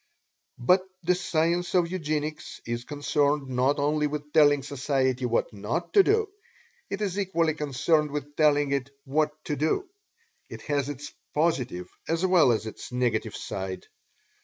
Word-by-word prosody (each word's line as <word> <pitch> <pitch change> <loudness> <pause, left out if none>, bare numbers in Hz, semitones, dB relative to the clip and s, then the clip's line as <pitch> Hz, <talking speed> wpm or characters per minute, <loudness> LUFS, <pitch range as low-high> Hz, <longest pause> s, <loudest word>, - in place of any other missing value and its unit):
But 180 +10 +4 0.2
the 180 +2 +3
Science 175 0 0
of 175 -1 +3
Eugenics 155 -3 -3
is 120 +1 -3
concerned 145 -1 0
not 130 +3 +2
only 150 +1 +1
with 150 0 -6
telling 145 -3 +5
society 130 -2 0
what 120 -1 0
"not 120 - -3
to 400 - +8
do" 435 +2 +2 0.6
it 200 - -4
is 200 -1 -2
equally 170 -5 +1
concerned 150 +1 +1
with 145 0 -5
telling 145 -2 +3
it 135 -1 -1 0.2
"what 150 +3 +2 0.2
to 150 - -1
do." 160 - 0 0.6
It - - -9
has 145 -2 -1
its 145 0 -7 0.2
Positive 125 - 0 0.2
as 165 +3 +1
well 180 -8 +5
as 110 -1 0
its 110 - -8
Negative 125 -1 0
side. 95 -1 -5
145 Hz, 150 wpm, -27 LUFS, 135-165 Hz, 0.6 s, to